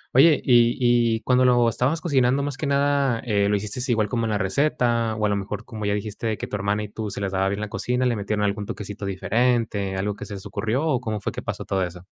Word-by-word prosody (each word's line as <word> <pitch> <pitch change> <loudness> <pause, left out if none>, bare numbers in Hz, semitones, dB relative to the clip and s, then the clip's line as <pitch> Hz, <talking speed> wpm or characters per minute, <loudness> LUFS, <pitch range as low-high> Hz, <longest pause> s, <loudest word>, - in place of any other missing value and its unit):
Oye, 150 +4 +6
y 120 -2 +4 0.4
y 110 - -5
cuando 125 0 +3
lo 120 -2 +4
estabas 130 +7 0
cocinando 135 -4 +2
más 145 -1 -3
que 150 - -3
nada, 140 -3 +2
eh, 100 -3 +2
¿lo 105 - +2
hiciste 105 +3 -3
igual 110 -3 +1
como 115 -1 -1
en - - -2
la 105 - +1
receta?, 115 +1 +1
o 110 -1 -1
a - - +2
lo 100 - +1
mejor, 105 +2 -5
como 110 -3 -6
ya 100 - +1
dijiste, 105 +2 -4
de 110 -1 -1
que - - -4
tu - - -5
hermana 100 +1 -1
y 105 - -7
tú 105 0 -5
se - - -5
la 100 -1 -1
daba 95 0 0
bien 100 +1 -3
la 110 - -4
cocina, 125 +4 -1
¿le 120 -2 +2
metieron 105 0 -2
algún 105 0 -2
toquecito 105 -2 -6
diferente, 105 0 0
algo 100 +2 -2
que - - -8
se 100 - -7
les 95 - -9
ocurrió, 110 +8 -1
o 135 -6 +1
cómo 110 -3 -3
fue 100 - -3
que - - -6
pasó - - -5
todo 95 -1 0
eso? 90 0 -7
110 Hz, 265 wpm, -24 LUFS, 100-125 Hz, 0.4 s, Oye